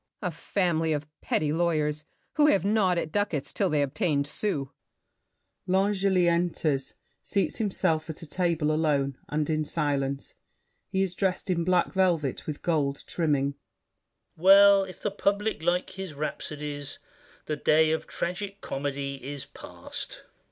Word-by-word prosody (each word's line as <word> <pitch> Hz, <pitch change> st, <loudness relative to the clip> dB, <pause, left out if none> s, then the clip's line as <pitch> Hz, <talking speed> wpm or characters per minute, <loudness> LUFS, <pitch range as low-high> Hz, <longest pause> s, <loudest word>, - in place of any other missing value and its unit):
BOUCHAVANNES. 180 Hz, -6 st, -3 dB
A -, -, -18 dB
family 165 Hz, -5 st, +1 dB
of 150 Hz, +1 st, -6 dB
petty 150 Hz, -1 st, 0 dB
lawyers, 155 Hz, -3 st, 0 dB, 0.3 s
who 300 Hz, -1 st, +4 dB
Have 195 Hz, -, +3 dB
gnawed 200 Hz, -4 st, +3 dB
at 160 Hz, -2 st, -2 dB
ducats 205 Hz, -9 st, -1 dB
'til -, -, +1 dB
they 150 Hz, -1 st, +2 dB
obtained 140 Hz, +1 st, 0 dB
sous. 145 Hz, -3 st, -2 dB, 1.0 s
[L'Angely 190 Hz, -1 st, +2 dB
enters, 170 Hz, -5 st, 0 dB, 0.3 s
seats 200 Hz, -, -1 dB
himself 165 Hz, -7 st, 0 dB
at 160 Hz, -, -6 dB
a -, -, -6 dB
table 165 Hz, -1 st, 0 dB
alone, 145 Hz, -3 st, +1 dB
and 150 Hz, 0 st, 0 dB
in 155 Hz, -1 st, 0 dB
silence. 140 Hz, -3 st, -2 dB, 0.6 s
He 190 Hz, 0 st, +1 dB
is 185 Hz, -2 st, -2 dB
dressed 190 Hz, 0 st, -1 dB
in 170 Hz, -2 st, +1 dB
black 180 Hz, 0 st, +2 dB
velvet 170 Hz, -8 st, +1 dB
with 150 Hz, -2 st, -5 dB
gold 145 Hz, -5 st, 0 dB
trimming. 145 Hz, -4 st, 0 dB, 0.8 s
VILLAC. 160 Hz, -, -15 dB
Well, 200 Hz, +1 st, +8 dB
if 185 Hz, -, -11 dB
the 210 Hz, -, 0 dB
public 205 Hz, -1 st, 0 dB
like 175 Hz, +2 st, 0 dB
his 190 Hz, -5 st, -7 dB
rhapsodies 145 Hz, -1 st, -5 dB, 0.5 s
The 150 Hz, -, -2 dB
day 155 Hz, +2 st, +4 dB
of 160 Hz, -, -2 dB
tragic 195 Hz, +3 st, -4 dB
comedy 140 Hz, -1 st, -4 dB
is 140 Hz, 0 st, -6 dB
past. -, -, -8 dB
160 Hz, 145 wpm, -27 LUFS, 145-185 Hz, 1.0 s, Well